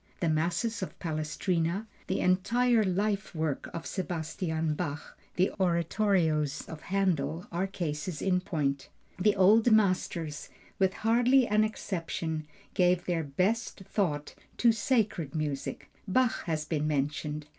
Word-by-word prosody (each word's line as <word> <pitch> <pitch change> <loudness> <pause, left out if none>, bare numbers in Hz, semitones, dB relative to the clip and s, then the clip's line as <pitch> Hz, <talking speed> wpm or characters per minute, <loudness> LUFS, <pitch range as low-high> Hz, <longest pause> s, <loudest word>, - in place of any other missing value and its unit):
The 170 - +1
Masses 170 +8 0
of 190 - -5
Palestrina, 165 +4 -1 0.2
the 190 - 0
entire 230 +5 +3
life 200 0 -1
work 155 -3 -2
of 165 -2 -6
Sebastian 160 -2 -2
Bach, 150 -2 -5 0.2
the 185 +1 +2
oratorios 170 -4 +1
of 160 -2 -8
Händel, 175 -4 0
are 180 +3 -1
cases 165 -3 -4
in 180 -1 +1
point. 140 -6 -2 0.3
The 205 +2 +3
old 215 +5 +5
masters 185 -7 +1 0.3
with 190 0 +2
hardly 245 +3 +5
an 215 -1 +3
exception 165 -7 -3 0.3
gave 180 -1 +3
their 170 -2 0
best 190 +11 -1
thought 170 -7 -1 0.2
to 235 - +5
sacred 215 - 0
music. 150 -3 -3 0.2
Bach 245 +5 +1
has 155 -3 -1
been 155 -1 -1
mentioned. 150 +1 -1
175 Hz, 125 wpm, -29 LUFS, 155-200 Hz, 0.3 s, old